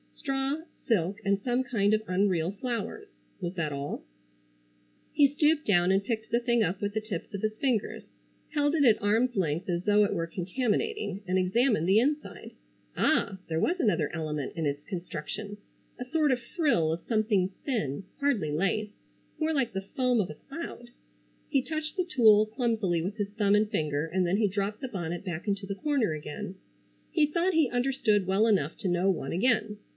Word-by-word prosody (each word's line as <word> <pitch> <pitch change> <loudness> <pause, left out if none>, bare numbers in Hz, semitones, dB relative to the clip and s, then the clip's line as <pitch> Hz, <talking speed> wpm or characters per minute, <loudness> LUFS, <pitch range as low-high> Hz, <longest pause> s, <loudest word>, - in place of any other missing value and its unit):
Straw, 275 +2 -2 0.3
silk 200 -2 +1
and 200 0 +2
some 245 +3 +1
kind 215 -5 +1
of 215 - -2
unreal 185 -2 +1
flowers. 245 - -4 0.3
Was 175 -2 -3
that 160 -4 -1
all? 140 0 -4 1.1
He 290 -2 +6
stooped 300 +2 +2
down 180 -2 +4
and 195 +1 +2
picked 220 0 -3
the 235 - +3
thing 235 -1 +2
up 185 0 -1
with 205 0 -2
the 220 - -1
tips 210 -2 -6
of 200 - -4
his 215 0 -1
fingers, 245 -6 -1 0.5
held 290 0 +1
it 300 - +3
at 230 -5 +5
arms 225 +4 +2
length 165 -2 -1
as 175 0 -1
though 210 0 +5
it 205 - +1
were 165 -3 -2
contaminating, 205 - -2
and 185 +1 +1
examined 195 -1 +2
the 195 +3 +5
inside. 290 +5 -2 0.4
Ah! 195 -1 +1
There 160 -1 -1
was 350 - +1
another 205 - +1
element 150 -4 -3
in 165 -2 -2
its 145 +1 -3
construction, 195 +4 -6 0.4
a 250 - -4
sort 305 +1 +2
of 250 - +1 0.2
frill 275 - +2
of 165 - -5
something 215 -5 +2 0.2
thin,—hardly 205 - -1
lace,—more 210 - -3
like 260 -7 0
the 195 0 -4
foam 250 -2 +3
of 195 - 0
a 150 - -7
cloud. - - -8 0.6
He 270 - +2
touched 310 0 -4
the 365 - +1
tulle 220 - +5
clumsily 220 -7 0
with 195 +6 -4
his 205 -2 -2
thumb 205 -1 +2
and 210 0 +2
finger 150 -7 -1
and 185 +2 0
then 180 +3 +1
he 215 -1 +3
dropped 200 +3 -2
the 265 - -3
bonnet 175 -4 -4
back 175 +1 -5
into 200 0 -1
the 200 0 -4
corner 275 - 0
again. 155 +6 -6 0.6
He 310 -3 +4
thought 340 +5 0
he 315 -5 +3
understood 245 -6 +1
well 195 +3 +3
enough 190 -9 +1
to - - -3
know 175 +2 +2
one 165 -7 -1
again. 215 +1 +1
210 Hz, 185 wpm, -28 LUFS, 180-250 Hz, 1.1 s, He